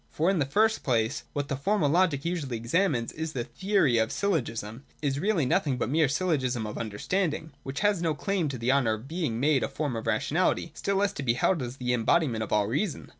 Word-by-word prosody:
For, 165 +5 +1
in 190 - 0
the 140 - +1
first 220 +9 +2
place, 115 0 0
what 145 -1 -2
the 140 - -2
Formal 190 +4 +1
Logic 165 -2 +2
usually 155 -9 -2
examines 120 - 0
in 160 - -10
its 160 0 -3
theory 130 - +1
of 110 0 +1
syllogism, 120 - -2 0.2
is 140 -2 -1
really 190 -5 +1
nothing 130 +1 +1
but 125 - -1
the - - -3
mere 155 -2 +3
syllogism 135 -7 0
of 105 - -5
understanding, 155 - -2
which 135 +1 -5
has 205 -4 +2
no 160 -3 0
claim 180 0 -1
to 135 - -4
the 120 +2 +1
honour 130 -5 +3
of 110 +4 -7
being 155 -8 -2
made 145 0 +3
a - - 0
form 145 -5 -3
of 115 - -5
rationality, - - +1
still 200 - -2
less 200 +1 +1
to - - -5
be 120 -4 +1
held 165 +4 +1
as 125 +1 -5
the 125 -1 -1
em 120 -2 0
bodiment 130 -6 +2
of 110 - -4
all 105 -1 +3
reason. 145 - -2
140 Hz, 230 wpm, -28 LUFS, 120-170 Hz, 0.2 s, mere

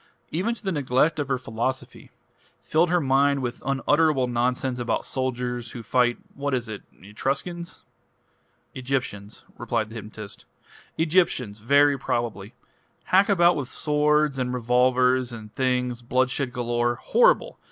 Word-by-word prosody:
Even 200 +9 -1
to - - -16
the 195 - -1
neglect 145 +1 +1
of 145 - -1
her 135 -2 0
philosophy. 125 +2 -4 0.5
Filled 165 +2 +2
her 180 0 +3
mind 140 -1 +2
with 120 -1 -4
unutterable 135 +1 +2
nonsense 125 +1 -1
about 120 - -1
soldiers 125 -2 -3
who 120 - -7
fight 120 0 +2 0.2
what 140 -1 -2
is 120 -2 -3
it? 110 -2 -6 0.2
Etruscans?" 140 - -4 0.9
"Egyptians." 125 -6 -4 1.5
"Egyptians 155 - +1
very 140 +4 +4
probably. 115 -4 -3 0.6
Hack 195 +2 +5
about 175 -3 +4
with 140 -4 -4
swords 150 -1 +1
and 125 0 -1
revolvers 125 +1 +2
and 110 -2 -10
things 125 -2 -1
bloodshed 130 +2 0
galore 120 -1 0
horrible! - - +2
130 Hz, 120 wpm, -25 LUFS, 120-150 Hz, 1.5 s, Hack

